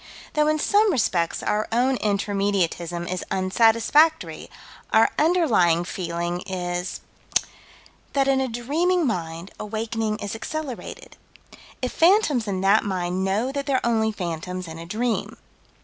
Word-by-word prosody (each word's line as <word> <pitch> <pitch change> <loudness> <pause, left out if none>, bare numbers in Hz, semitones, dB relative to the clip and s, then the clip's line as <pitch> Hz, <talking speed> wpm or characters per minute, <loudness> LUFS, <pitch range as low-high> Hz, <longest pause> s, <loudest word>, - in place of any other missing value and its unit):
Though 300 0 +2
in 310 0 +2
some 410 +6 +3
respects 185 - 0
our 210 +1 0
own 250 +3 +2
Intermediatism 195 -5 -1
is 185 0 -3
unsatisfactory, 230 +11 +2 0.4
our - - +5
underlying 245 - +3
feeling 175 -1 -3
is 180 -1 -3 1.1
That 275 -1 +2
in 270 -1 +3
a 265 - 0
dreaming 310 +9 0
mind 170 -5 -3
awakening 220 0 -2
is 205 -2 -5
accelerated 275 +3 -6 0.7
if 255 - 0
phantoms 325 - +3
in 190 -2 -2
that 200 +3 +4
mind 185 -2 -2
know 210 +7 0
that 280 0 -4
they're 265 -3 +1
only 220 -2 +2
phantoms 180 -1 -5
in 160 0 -8
a 165 - -8
dream. 225 +4 -2
215 Hz, 130 wpm, -24 LUFS, 180-265 Hz, 1.1 s, our